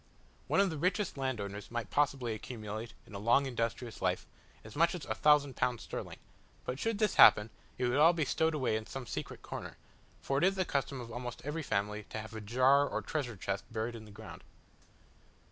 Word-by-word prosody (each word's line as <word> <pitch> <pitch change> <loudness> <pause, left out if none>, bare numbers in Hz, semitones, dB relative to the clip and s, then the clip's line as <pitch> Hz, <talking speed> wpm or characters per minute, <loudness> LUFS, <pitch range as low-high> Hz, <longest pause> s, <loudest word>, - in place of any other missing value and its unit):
One - - +2
of 200 -2 +4
the 155 - -4
richest 180 +3 0
landowners 105 -7 -3
might 120 -2 -4
possibly 135 -5 +1
accumulate, 110 0 -6
in - - -15
a 100 - -5
long 120 +6 +4
industrious 115 -2 -3
life, - - 0 0.4
as 110 - -11
much 170 +3 +3
as 170 - -6
1000 145 -3 +3
pounds 125 -2 0
sterling; - - -6 0.5
but 125 +2 -3
should 225 +2 0
this 215 -1 +1
happen, 105 +2 +8 0.3
it 125 - 0
would 125 +3 +2
all 160 +3 +8
be 165 -3 0
stowed 160 +1 +1
away 130 -6 +1
in 110 0 -3
some 135 -2 -6
secret - - -6
corner, - - -7 0.4
for 135 0 0
it - - 0
is 190 +1 +4
the 185 -1 0
custom 140 -2 -1
of 120 -1 -7
almost 120 +1 -6
every 150 +3 -2
family 105 -4 -1
to - - -5
have 110 +1 -7
a 110 - -6
jar 130 +6 +4
or - - -3
treasure 125 -9 -3
chest 100 +1 -3
buried 115 +1 -2
in 110 -2 -9
the - - -13
ground. 110 +2 -10
125 Hz, 205 wpm, -33 LUFS, 110-145 Hz, 0.5 s, happen